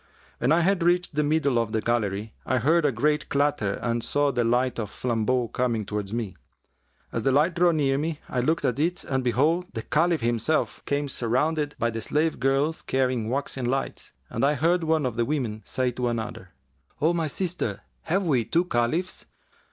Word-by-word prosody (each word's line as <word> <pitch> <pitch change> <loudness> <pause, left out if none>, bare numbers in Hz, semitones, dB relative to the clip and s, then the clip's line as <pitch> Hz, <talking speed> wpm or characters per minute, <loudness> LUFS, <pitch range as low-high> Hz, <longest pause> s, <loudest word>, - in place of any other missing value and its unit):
When 125 - +2
I 165 +2 +5
had 190 +1 +2
reached 175 0 +2
the 150 - +1
middle 145 -4 +2
of 115 -1 -2
the 110 - +2
gallery, 110 -2 -1
I 130 - 0
heard 155 +6 +3
a 145 - +3
great 150 +5 0
clatter 140 -8 +1
and 120 -1 0
saw 145 -1 +1
the 120 -2 0
light 120 +2 +1
of 105 -3 -3
flambeaux 120 +1 0
coming 115 -3 -1
towards 105 -1 -4
me. 110 -5 -3 0.8
As 115 - -2
the 135 - +2
light 150 +6 +3
drew 175 0 +4
near 140 -4 +1
me, 155 0 -2
I 125 - -2
looked 155 +6 +1
at 125 +2 0
it 170 +4 0
and 130 -1 -1
behold, 150 +9 +2
the 115 - -3
Caliph 165 0 +2
himself, 120 +6 0
came 145 0 0
surrounded 145 +5 0
by 115 0 0
the 115 0 -4
slave 155 +7 0
girls 135 +4 +1
carrying 130 -4 0
waxen 135 -1 -2
lights, 135 +2 -2 0.2
and 115 - -3
I 145 +2 +3
heard 170 +4 +2
one 160 -2 +1
of 120 -3 -2
the 120 - +2
women[FN#360] 115 -7 -3
say 130 -1 0
to 125 0 -2
another, 115 -2 -4 0.5
'O 160 +3 +3
my 165 -2 0
sister, 165 - -3 0.2
have 190 +5 +1
we 135 -9 +2
two 170 +10 +1
Caliphs? 160 +6 -1
135 Hz, 195 wpm, -26 LUFS, 120-155 Hz, 0.8 s, I